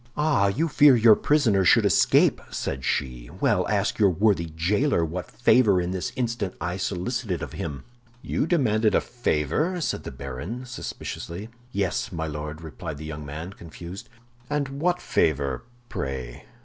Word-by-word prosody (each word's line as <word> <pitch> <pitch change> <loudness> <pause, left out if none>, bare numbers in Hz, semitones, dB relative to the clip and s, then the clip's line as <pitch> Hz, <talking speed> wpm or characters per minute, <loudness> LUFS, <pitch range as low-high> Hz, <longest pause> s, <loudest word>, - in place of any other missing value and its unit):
"Ah, 150 -9 +3
you 140 +12 +1
fear 145 -3 +6
your 115 -1 +7
prisoner 115 -11 +3
should - - +5
escape!" - - +4
said 65 -1 -4
she. 60 -3 -2
"Well, - - +2
ask - - 0
your 100 -2 +6
worthy 90 -2 +1
jailer 95 - +2
what 85 +3 -5
favor 115 -5 +4
I 90 - -1
this 90 -2 -3
instant 115 -6 -2 0.2
solicited 95 +1 -2
of - - -7
him." 70 -4 -5 0.4
"You - - -1
demanded 110 -10 +2
a - - +5
favor?" 120 - -1
said 165 - -2
the - - -5
baron, 70 - -6
suspiciously. 105 -4 -6 0.2
"Yes, 100 +1 -1
my 80 -3 -3
Lord," 75 0 -5
replied 80 0 -7
the 75 - -8
young 75 -1 -6
man, 80 +6 -6
confused. 85 +7 -10 0.4
"And 145 -2 -1
what 170 +6 0
favor, 70 -5 0 0.2
pray?" 65 - -5
95 Hz, 150 wpm, -25 LUFS, 75-120 Hz, 0.4 s, your